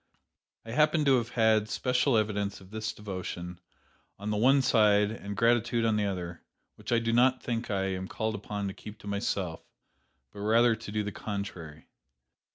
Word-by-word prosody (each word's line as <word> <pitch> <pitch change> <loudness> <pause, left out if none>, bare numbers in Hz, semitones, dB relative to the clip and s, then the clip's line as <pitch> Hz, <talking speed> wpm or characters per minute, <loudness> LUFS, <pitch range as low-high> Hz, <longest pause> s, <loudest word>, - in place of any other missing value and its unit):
I 115 - -7
happen 150 +3 +3
to 135 -2 +5
have 120 -1 -2
had 110 -2 +2
special 125 0 +1
evidence 105 -2 -1
of 95 0 -16
this 110 0 -3
devotion 90 -3 -6 0.6
on 105 +2 -4
the - - 0
one 135 +5 +4
side 105 -3 +4
and 100 -3 -6
gratitude 115 0 +2
on 110 -1 +2
the 105 -1 +1
other, 90 -3 -5 0.3
which - - -9
I 120 - +4
do 115 0 0
not 125 +2 +3
think 120 -1 -3
I 95 -2 0
am 95 0 -3
called 110 +2 -2
upon 105 -1 -4
to 95 - -4
keep 105 +2 -10
to - - -11
myself, 100 -4 -2 0.7
but - - -11
rather 115 +3 +4
to 110 -2 -9
do 105 0 -1
the 105 - -4
contrary. 90 -7 -6
105 Hz, 180 wpm, -29 LUFS, 100-115 Hz, 0.7 s, to